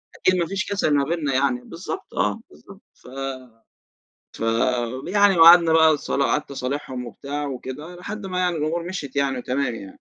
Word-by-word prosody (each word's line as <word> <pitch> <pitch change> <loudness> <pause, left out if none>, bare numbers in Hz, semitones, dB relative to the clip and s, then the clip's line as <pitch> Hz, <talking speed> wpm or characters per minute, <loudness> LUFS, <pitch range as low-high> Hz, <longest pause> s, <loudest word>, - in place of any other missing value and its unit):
أكيد 185 - +2
ما 170 - +1
فيش 195 +2 -2
كسَل 195 -7 +1
ما 140 - +3
بينَّا 150 -2 -1
يعني. 130 -2 +1
بالضبط، 185 - -8
آه، - - 0
بالضبط، 195 0 -16
ف - - -19 1.3
فيعني 130 - +1
وقعدنا 170 0 +8
بقى 160 -1 +5
صلا 140 -1 -1
قعدت 150 0 -1
أصالِحهُم 130 -1 -4
وبتاع 145 +4 -5
وكده، 140 +6 -7
لحد 200 +3 -7
ما 185 -1 -3
يعني 180 -1 +1
الأمور 160 +3 -1
مِشيِت 170 -7 -6
يعني 135 -2 0
وتمام 125 0 -2
يعني. 100 -3 -8
150 Hz, 160 wpm, -23 LUFS, 130-175 Hz, 1.3 s, وقعدنا